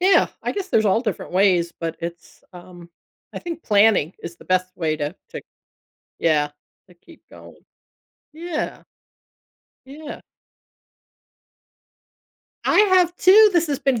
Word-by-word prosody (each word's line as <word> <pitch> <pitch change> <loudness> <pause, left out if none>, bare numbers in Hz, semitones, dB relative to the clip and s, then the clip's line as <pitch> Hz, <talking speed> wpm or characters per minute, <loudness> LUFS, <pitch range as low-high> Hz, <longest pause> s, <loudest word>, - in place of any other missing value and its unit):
yeah, 380 +2 +4 0.2
I - - -2
guess 395 -2 -5
there's 220 -10 +2
all 200 +3 +2
different 215 -6 -5
ways, 180 -3 +2
but 165 -1 -4
it's, 170 0 -9
um, 175 -1 -14 0.4
I - - -6
think 335 -2 -7
planning 205 -6 +3
is 170 - -7
the - - -17
best 185 0 -1
way 160 -3 -1
to 150 +3 -4 0.2
to, 475 - -7 0.8
yeah, 150 -3 +1 0.4
to - - -18
keep 325 - -19
going. - - -15 0.8
Yeah. 325 0 -5 1.0
Yeah. 300 +3 -10 2.4
I - - +2
have 370 -4 +3
too. 420 +4 +6
This 345 -2 +2
has 285 -2 -1
been 260 -4 0
210 Hz, 135 wpm, -21 LUFS, -, 2.4 s, too